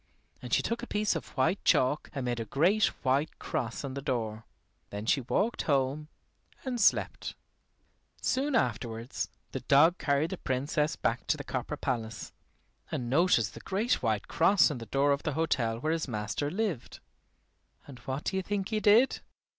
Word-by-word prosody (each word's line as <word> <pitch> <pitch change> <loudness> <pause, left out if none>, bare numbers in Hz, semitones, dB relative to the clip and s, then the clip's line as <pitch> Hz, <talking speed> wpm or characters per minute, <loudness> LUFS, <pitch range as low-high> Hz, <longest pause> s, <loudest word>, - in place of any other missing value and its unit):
And - - -8
she - - +3
took 230 +1 -2
a 245 - -6
piece 210 -3 0
of 160 - -4
white 160 +9 +1
chalk 130 +4 +2
and 135 -2 -2
made 120 -1 -1
a 115 - -3
great 180 - +3 0.2
white 135 +3 +1
cross 120 +3 -3
on 135 -2 -4
the 140 - -4
door. 115 -5 -3 0.4
Then 105 +1 -5
she 135 - +2
walked 205 - 0
home 140 +2 +1 0.6
and 250 -3 -2
slept. - - +2 0.8
Soon 275 +1 0
afterwards 115 - -1 0.2
the - - -3
dog 160 +6 +4
carried 145 +3 +1
the 190 - -4
Princess 145 +4 0
back 120 +2 -1
to 155 - +2
the 145 - -6
copper 135 +2 -4
palace, 115 -5 -4 0.6
and 120 -1 -3
noticed 140 - +3
the - - -9
great 215 +6 0
white 110 -3 0
cross 195 -5 +4
on 135 - -4
the 115 - -8
door 140 +5 +2
of 140 +1 +1
the 155 - -2
hotel 130 -8 0
where 155 +7 -1
his 165 -2 -2
master 110 +5 -2
lived. 190 - -3 0.9
And 135 -3 -11
what 130 +4 -4
do - - -2
you - - +1
think 195 0 -2
he 215 - 0
did? 215 +5 +5
140 Hz, 180 wpm, -30 LUFS, 125-185 Hz, 0.9 s, did